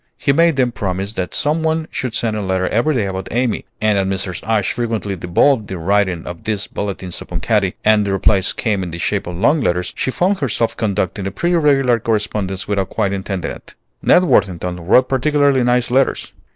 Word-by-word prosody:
He 140 - +1
made 165 +1 +4
them 125 -2 +1
promise 100 -1 -3
that 90 -4 -3
some 150 +3 +1
one 160 0 0
should 125 -3 -3
send 110 -2 0
a 105 - -2
letter 95 -1 0
every 130 +7 +1
day 110 -5 +1
about 95 -1 -4
Amy; 120 0 -1
and 105 -2 +2
as 95 - 0
Mrs. 95 -1 -2
Ashe 110 -4 +1
frequently 110 -4 -2
devolved 105 +7 +2
the 95 - -5
writing 95 0 0
of 85 -1 -8
these 105 -2 -1
bulletins 95 -3 -5
upon 90 - -5
Katy, 100 -2 +1
and 110 -1 +4
the 100 - -2
replies 95 0 +2
came 105 -4 -1
in 90 - -4
the 85 - -6
shape 100 +3 -1
of 90 - -5
long 145 - +2
letters, 90 -5 -1
she - - -1
found 185 +8 +1
herself 120 -4 -1
conducting 100 -2 -2
a - - -3
pretty 175 - 0
regular 135 -7 +3
correspondence 105 -4 -2
without 100 -2 -1
quite 100 -3 -1
intending 95 -1 -3
it. - - -12 0.3
Ned 180 - +5
Worthington 90 - +1
wrote 125 +6 +5
particularly 140 0 +2
nice 120 0 +1
letters. 135 +1 +1
105 Hz, 205 wpm, -18 LUFS, 95-125 Hz, 0.3 s, Ned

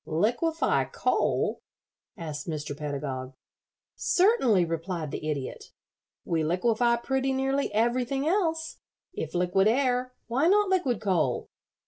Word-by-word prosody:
"Liquefy 240 - +1
coal?" - - 0 0.6
asked 155 -1 -6
Mr. 150 -2 -4
Pedagog. 140 -3 -4 0.6
"Certainly," 265 - +3
replied 165 -1 -3
the 155 - -4
Idiot. 140 -4 -4 0.6
"We 165 -2 0
liquefy 230 +8 +2
pretty 265 +2 -1
nearly 270 0 0
everything 245 +5 0
else. 325 -3 0 0.4
If - - -5
liquid 180 +3 +3
air, 250 +1 +1
why 260 +7 +1
not 410 +1 +4
liquid 310 - +1
coal? 175 - 0
230 Hz, 110 wpm, -27 LUFS, 160-270 Hz, 0.6 s, not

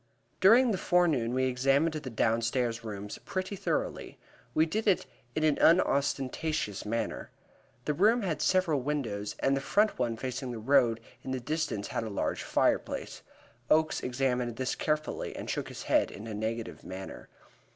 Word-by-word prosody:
During 230 +6 +6
the 190 - -1
forenoon 160 -10 +2
we 130 - +2
examined 135 +5 +2
the 150 -4 -5
downstairs 115 +1 0
rooms 105 -2 -6
pretty 185 +1 -3
thoroughly. - - -2 0.4
We 155 - +5
did 215 +7 -2
it 195 - +3 0.3
in 155 - 0
an 155 -2 +3
unostentatious 140 - +1
manner. 115 +1 -2 0.6
The 150 - +1
rooms 210 +7 +3
had 165 -4 -2
several 180 -7 +2
windows, 120 -8 -2
and 135 0 +3
the 135 - -1
front 210 +5 +2
one 120 -2 0
facing 130 +1 -4
the 120 - -4
road 120 -1 +3 0.2
in - - -8
the 130 0 -1
distance 150 -6 -2
had - - -2
a 110 - -4
large 100 - -2
fireplace. - - 0 0.5
Oakes 155 0 +3
examined 125 -2 -1
this 130 +1 -1
carefully 155 0 -2
and - - -6
shook - - -2
his - - -8
head - - +2
in 105 - -9
a 110 - -5
negative 110 +2 -4
manner. 95 +1 -8
135 Hz, 160 wpm, -30 LUFS, 115-155 Hz, 0.6 s, During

